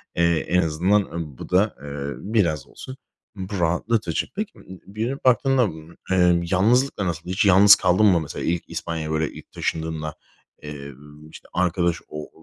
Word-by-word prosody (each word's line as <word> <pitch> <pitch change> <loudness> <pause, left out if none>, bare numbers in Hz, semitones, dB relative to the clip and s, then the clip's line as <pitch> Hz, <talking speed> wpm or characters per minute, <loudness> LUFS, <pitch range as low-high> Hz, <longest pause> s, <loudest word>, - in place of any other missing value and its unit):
Eee, 85 -1 +3
en 90 +3 +1
azından, 90 +6 +2
ııı, 80 -8 -7
bu - - -9
da, 95 +4 +2
eee, 70 -1 -5
biraz 85 - 0
olsun 130 0 -10 0.4
bu 95 0 -5
rahatlatıcı. 85 +2 0
Peki, 215 +1 -3
ımm, - - -17 0.2
bir 110 +4 -3
dönüp 135 +2 -6
baktığında, 130 +1 +4
ımm, 80 -4 -6 0.2
emm, 90 -2 +3
yalnızlıkla 110 +4 +2
nasıl? 85 0 -4
Hiç 95 +3 +1
yalnız 100 +1 +8
kaldın 95 +4 +3
mı, 95 -5 +5
mesela, 75 - -6
ilk 85 0 -2
İspanya'ya, 80 -1 -4
böyle, 80 -1 0
ilk - - -13
taşındığında, 80 -1 -3 0.5
eee, 70 -1 -8 0.4
işte, - - -13
arkadaş 85 -1 0
o 75 0 -8
90 Hz, 165 wpm, -23 LUFS, 80-100 Hz, 0.5 s, yalnız